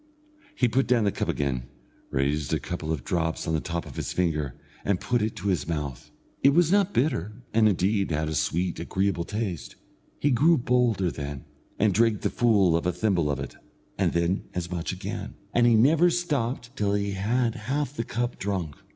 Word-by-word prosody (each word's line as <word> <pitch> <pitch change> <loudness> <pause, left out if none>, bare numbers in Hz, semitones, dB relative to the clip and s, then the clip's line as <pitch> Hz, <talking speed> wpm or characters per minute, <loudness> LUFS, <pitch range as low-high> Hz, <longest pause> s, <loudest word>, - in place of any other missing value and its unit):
He 125 - +3
put 130 +4 +1
down 120 -3 +3
the 100 - +2
cup - - -3
again, 65 -3 -1 0.4
raised 70 +2 0
a - - -1
couple 85 -3 -4
of 75 -6 -2
drops 80 0 -1
on 80 - 0
the 80 - +2
top 85 0 -3
of 70 -5 -11
his - - -3
finger, 75 -7 0 0.3
and 100 -3 +1
put 120 -2 0
it 110 +1 -1
to 100 +3 -2
his 85 -6 0
mouth. 75 -6 -4 0.3
It 140 +1 +5
was 175 -1 +4
not 200 -1 +3
bitter, 120 - -1
and, 110 -1 +5
indeed, 100 +1 +1
had 80 -1 -1
a 80 - -2
sweet, 80 +4 0
agreeable 95 0 -1
taste. 105 -6 -4 0.4
He 145 - +2
grew 155 +7 +5
bolder 120 -7 +2
then, 70 -2 -6 0.3
and 105 -2 +3
drank 110 0 +3
the - - 0
full 100 -8 +3
of 85 +1 0
a - - +3
thimble 90 -7 +1
of 70 -2 -1
it, 70 - -6 0.4
and - - +1
then 85 +3 0
as 90 -1 -3
much 85 -2 -2
again, - - -5 0.2
and 120 0 +4
he 120 - +5
never 155 +10 +5
stopped 135 -8 -2
till 100 -4 +1
he 100 0 -1
had 115 +5 0
half 130 +5 -2
the 115 - -1
cup 120 +2 -3
drunk. 95 -7 -3
100 Hz, 200 wpm, -26 LUFS, 80-120 Hz, 0.4 s, It